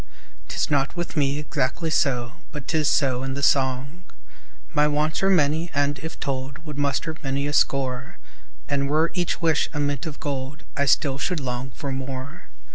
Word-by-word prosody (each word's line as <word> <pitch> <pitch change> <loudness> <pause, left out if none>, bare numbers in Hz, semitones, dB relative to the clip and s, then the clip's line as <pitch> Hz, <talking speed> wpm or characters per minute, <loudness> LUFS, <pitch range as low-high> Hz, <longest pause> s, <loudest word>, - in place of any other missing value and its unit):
'Tis - - -1
not 140 +2 +2
with 175 -1 -3
me 140 -2 +2
exactly 150 +2 -1
so; 125 -6 +2 0.2
But 150 -4 -7
'tis 155 -3 +2
so 130 -3 +3
in 135 0 -2
the 140 - -3
song. 135 +4 +2 0.7
My 150 0 +4
wants 150 +2 +1
are 195 - +4
many 160 -1 +3
and, 145 0 +1
if 160 +3 -7
told, 135 0 -3
Would 150 -2 -6
muster 145 +3 0
many 140 -1 -1
a 145 - -1
score; 130 -3 +1 0.5
And 140 -2 0
were 155 +3 +3
each 175 -1 -1
wish 160 -2 +3
a 150 - -2
mint 145 0 -1
of 150 -2 -6
gold, 140 0 -4
I 140 - +2
still 135 -1 +3
should 180 0 0
long 125 -1 -3
for 140 0 -5
more. 130 +1 -5
140 Hz, 180 wpm, -25 LUFS, 135-155 Hz, 0.7 s, My